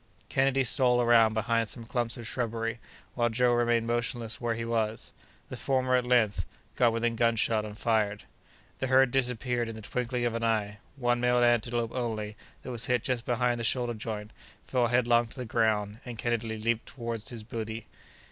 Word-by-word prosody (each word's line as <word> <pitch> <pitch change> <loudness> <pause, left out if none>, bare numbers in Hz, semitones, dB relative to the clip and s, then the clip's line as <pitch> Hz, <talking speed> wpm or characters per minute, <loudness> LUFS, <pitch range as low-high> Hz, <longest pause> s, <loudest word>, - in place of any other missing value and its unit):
Kennedy 135 0 +2
stole 125 0 +3
around 115 -2 +5
behind 115 0 +1
some 115 -2 -8
clumps 120 0 -1
of 120 - -8
shrubbery, 115 -1 -2 0.3
while 120 -1 +1
Joe 120 +1 +2
remained 120 -1 +2
motionless 120 0 -2
where 120 -1 0
he 115 0 -4
was. 110 -1 -1 0.4
The - - -5
former, 130 -1 +1
at 125 -1 +1
length, 120 -5 +3 0.3
got 120 -2 +4
within 115 0 0
gunshot 115 -1 +2
and 105 0 -8
fired. 105 -3 0 0.6
The 130 - -1
herd 130 0 +5
disappeared 125 -2 0
in 115 - -6
the 110 - -8
twinkling 125 +2 -2
of 120 - 0
an 115 0 -3
eye; 105 -2 0 0.2
one 120 -3 +1
male 125 0 +3
antelope 120 -1 +2
only, 110 -4 -3 0.3
that 130 - -6
was 120 -2 -2
hit 125 -2 +1
just 125 -2 -1
behind 120 0 +1
the - - -3
shoulder 120 +1 0
joint, 105 -1 -5 0.3
fell 125 -2 +1
headlong 120 -1 +3
to 115 - -12
the 125 - -4
ground, 110 -2 0
and 120 -2 -7
Kennedy 115 -1 -1
leaped 115 +1 -1
toward 115 -3 -5
his 115 0 -5
booty. 110 0 -5
115 Hz, 185 wpm, -29 LUFS, 110-125 Hz, 0.6 s, around